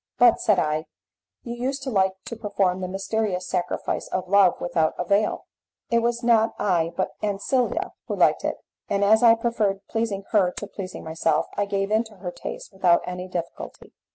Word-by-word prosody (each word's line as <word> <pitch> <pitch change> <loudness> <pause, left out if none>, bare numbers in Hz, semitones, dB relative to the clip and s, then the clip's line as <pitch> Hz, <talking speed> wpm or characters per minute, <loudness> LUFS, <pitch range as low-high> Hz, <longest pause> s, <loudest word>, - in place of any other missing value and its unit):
"But," 240 -1 +5
said 210 -3 +3
I, 155 0 0 0.6
"you 235 - -5
used 265 +3 -3
to 265 - -3
like 190 -3 +2
to 235 - -6
perform 200 -4 0
the 185 - -2
mysterious 195 -1 -2
sacrifice 180 -2 -2
of 185 0 -3
Love 195 -2 +4
without 160 -2 0
a 180 - -2
veil." 200 +4 +1 0.5
"It 235 - +4
was 235 +1 -1
not 225 -2 +3
I 170 -4 +1
but 190 - 0
Ancilla 210 +5 0 0.2
who - - -2
liked - - +3
it, - - -1 0.3
and 200 0 +1
as 220 +2 +5
I 230 -1 +7
preferred 215 -4 -1
pleasing 225 -3 -2
her 200 -5 +4
to - - -6
pleasing 190 -2 -7
myself, 160 -1 0
I 205 - +1
gave 195 0 -1
in 220 +1 +3
to 220 -1 -14
her 180 -2 -6
taste - - -8
without 180 -3 +3
any 180 0 -5
difficulty." 170 -2 -7
200 Hz, 185 wpm, -24 LUFS, 180-225 Hz, 0.6 s, I